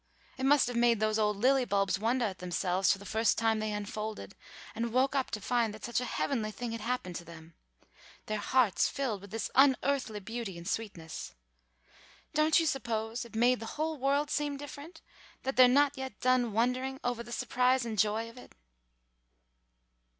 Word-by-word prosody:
It 265 Hz, 0 st, -1 dB
must 290 Hz, 0 st, +5 dB
have 245 Hz, 0 st, -4 dB
made 235 Hz, -2 st, +3 dB
those 215 Hz, 0 st, +1 dB
old 210 Hz, -1 st, +1 dB
lily 260 Hz, +4 st, +3 dB
bulbs 195 Hz, -3 st, +1 dB
wondah 235 Hz, +2 st, +1 dB
at 185 Hz, -, -14 dB
themselves 180 Hz, +1 st, +1 dB
the 200 Hz, 0 st, -3 dB
first 220 Hz, +1 st, +1 dB
time 225 Hz, -1 st, +2 dB
they 215 Hz, 0 st, -2 dB
unfolded 210 Hz, +1 st, -5 dB, 0.4 s
and 230 Hz, 0 st, -2 dB
woke 260 Hz, +3 st, +2 dB
up 270 Hz, -2 st, 0 dB
to 215 Hz, -, -4 dB
find 225 Hz, 0 st, 0 dB
that 215 Hz, -, -8 dB
such 240 Hz, +1 st, 0 dB
a -, -, -2 dB
heavenly 230 Hz, -2 st, -1 dB
thing 235 Hz, +2 st, -5 dB
had 230 Hz, -1 st, -5 dB
happened 230 Hz, -6 st, -3 dB
to 175 Hz, -, -8 dB
them, 165 Hz, -1 st, -13 dB, 0.7 s
their 215 Hz, 0 st, -2 dB
hearts 230 Hz, -1 st, +2 dB
filled 250 Hz, -8 st, -2 dB
with 200 Hz, -, -11 dB
this 225 Hz, +3 st, -4 dB
unearthly 265 Hz, -4 st, +3 dB
beauty 225 Hz, -2 st, -5 dB
and 170 Hz, 0 st, -9 dB
sweetness. 185 Hz, -8 st, -5 dB, 1.0 s
Don't 305 Hz, +2 st, +4 dB
you 330 Hz, -, +1 dB
suppose 235 Hz, -5 st, -2 dB
it 230 Hz, -, -13 dB
made 245 Hz, +2 st, +3 dB
the 225 Hz, -, -6 dB
whole 315 Hz, -1 st, -2 dB
world 280 Hz, +3 st, +1 dB
seem 290 Hz, -1 st, -1 dB
different, 290 Hz, +3 st, -10 dB, 0.4 s
that 265 Hz, +1 st, -2 dB
they're 255 Hz, -1 st, +8 dB
not 285 Hz, +3 st, +4 dB
yet 265 Hz, -5 st, -7 dB
done 255 Hz, -2 st, +2 dB
wondering 250 Hz, +4 st, 0 dB
ovah 245 Hz, -1 st, -2 dB
the 240 Hz, -, -12 dB
surprise 250 Hz, +1 st, +1 dB
and 220 Hz, -3 st, -4 dB
joy 215 Hz, +2 st, +1 dB
of 230 Hz, +2 st, -12 dB
it?" -, -, -15 dB
235 Hz, 185 wpm, -31 LUFS, 215-260 Hz, 1.0 s, they're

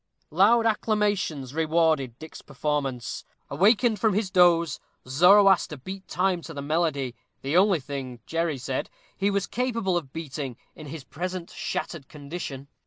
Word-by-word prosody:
Loud 215 Hz, +8 st, +4 dB
acclamations 205 Hz, -, 0 dB
rewarded 160 Hz, -6 st, +1 dB
Dick's 160 Hz, +2 st, -10 dB
performance. 140 Hz, -4 st, -3 dB, 0.3 s
Awakened 210 Hz, -, +3 dB
from 215 Hz, -2 st, +2 dB
his 205 Hz, -3 st, -1 dB
doze, 170 Hz, -4 st, +4 dB, 0.3 s
Zoroaster 180 Hz, +3 st, +5 dB
beat 190 Hz, +8 st, -8 dB
time 180 Hz, -1 st, 0 dB
to 160 Hz, -1 st, -9 dB
the 140 Hz, -, -4 dB
melody, 145 Hz, -4 st, 0 dB, 0.3 s
the 140 Hz, +4 st, -1 dB
only 190 Hz, -1 st, +5 dB
thing, 130 Hz, -3 st, -6 dB
Jerry 165 Hz, -3 st, -1 dB
said, 130 Hz, +1 st, -3 dB, 0.3 s
he 200 Hz, 0 st, +1 dB
was 200 Hz, -1 st, 0 dB
capable 230 Hz, -7 st, -1 dB
of 145 Hz, -6 st, -5 dB
beating 145 Hz, -5 st, -5 dB, 0.2 s
in 155 Hz, -, -11 dB
his 150 Hz, 0 st, -7 dB
present 175 Hz, +6 st, -5 dB
shattered 155 Hz, -6 st, -4 dB
condition. 140 Hz, -2 st, -7 dB
165 Hz, 140 wpm, -26 LUFS, 140-195 Hz, 0.3 s, Zoroaster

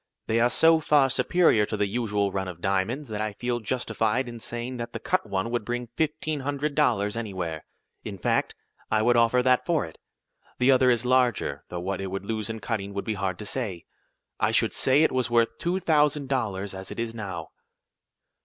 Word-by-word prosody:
"They 115 Hz, +1 st, +1 dB
are 120 Hz, +1 st, +4 dB
so 160 Hz, +5 st, +5 dB
far 145 Hz, -3 st, +3 dB
superior 125 Hz, -, +3 dB
to 105 Hz, -, -3 dB
the 105 Hz, -, +2 dB
usual 105 Hz, -2 st, -1 dB
run 95 Hz, -1 st, -2 dB
of 90 Hz, -2 st, -7 dB
diamonds, 100 Hz, +10 st, -1 dB
that 105 Hz, -1 st, -3 dB
I 110 Hz, -1 st, -2 dB
feel 120 Hz, +3 st, -2 dB
justified 115 Hz, +1 st, -1 dB
in 120 Hz, -1 st, -7 dB
saying 120 Hz, +3 st, -5 dB
that 120 Hz, -1 st, -6 dB
the -, -, -4 dB
cut -, -, -1 dB
one 95 Hz, +4 st, -1 dB
would 120 Hz, -2 st, -1 dB
bring 120 Hz, +1 st, -4 dB
fifteen 155 Hz, -1 st, -1 dB
hundred 145 Hz, +2 st, -2 dB
dollars, 105 Hz, -8 st, +1 dB
anywhere. 90 Hz, -8 st, -4 dB, 0.4 s
In -, -, -6 dB
fact, -, -, 0 dB, 0.3 s
I 110 Hz, 0 st, +2 dB
would 120 Hz, +1 st, +4 dB
offer 120 Hz, +2 st, +4 dB
that 125 Hz, 0 st, +3 dB
for 170 Hz, -4 st, +1 dB
it. 80 Hz, -, -13 dB, 0.6 s
The 125 Hz, +2 st, +4 dB
other 130 Hz, -1 st, +5 dB
is 120 Hz, -1 st, +2 dB
larger, 125 Hz, -, +1 dB
though 90 Hz, -1 st, -5 dB
what 95 Hz, +2 st, -3 dB
it 95 Hz, -, -3 dB
would 95 Hz, +1 st, -5 dB
lose 110 Hz, -1 st, -2 dB
in 110 Hz, 0 st, -4 dB
cutting 100 Hz, -4 st, -3 dB
would 100 Hz, -, -3 dB
be 110 Hz, -, -1 dB
hard 95 Hz, -2 st, -2 dB
to 105 Hz, -, -7 dB
say. 100 Hz, -8 st, -3 dB, 0.5 s
I -, -, +2 dB
should -, -, +2 dB
say 135 Hz, +4 st, +4 dB
it -, -, +3 dB
was 130 Hz, -2 st, 0 dB
worth 115 Hz, -1 st, +2 dB
two 175 Hz, +2 st, 0 dB
thousand 150 Hz, -5 st, +2 dB
dollars 100 Hz, -7 st, -2 dB
as 95 Hz, 0 st, -7 dB
it -, -, -7 dB
is 115 Hz, -1 st, -2 dB
now." 95 Hz, -8 st, -6 dB
115 Hz, 210 wpm, -26 LUFS, 100-130 Hz, 0.6 s, so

